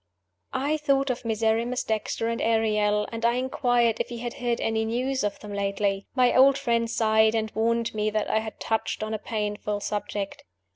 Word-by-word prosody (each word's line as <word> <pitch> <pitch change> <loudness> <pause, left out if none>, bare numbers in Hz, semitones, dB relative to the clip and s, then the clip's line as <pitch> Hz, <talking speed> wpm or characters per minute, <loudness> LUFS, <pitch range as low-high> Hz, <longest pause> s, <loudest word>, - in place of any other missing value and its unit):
I 290 +4 +1
thought 275 -2 +1
of 245 - -5
Miserrimus 230 +2 0
Dexter 220 +1 -2
and 230 0 -2
Ariel; 210 -2 +2
and 230 0 -5
I 235 0 +4
inquired 245 -2 +1
if - - -2
he 240 - -6
had 240 0 -4
heard 240 -1 -1
any 225 0 0
news 255 +3 -1
of 205 -1 -2
them 210 -1 -8
lately. 200 0 -1
My 250 -2 +4
old 270 +1 +6
friend 235 -4 0
sighed, 220 -1 +3
and 220 -1 -1
warned 230 +1 0
me 215 0 0
that 215 0 -1
I 220 - +2
had 220 0 -7
touched 220 -1 -1
on 215 +1 -3
a 215 - -2
painful 210 -1 -3
subject. 205 -1 -4
225 Hz, 190 wpm, -26 LUFS, 215-240 Hz, -, old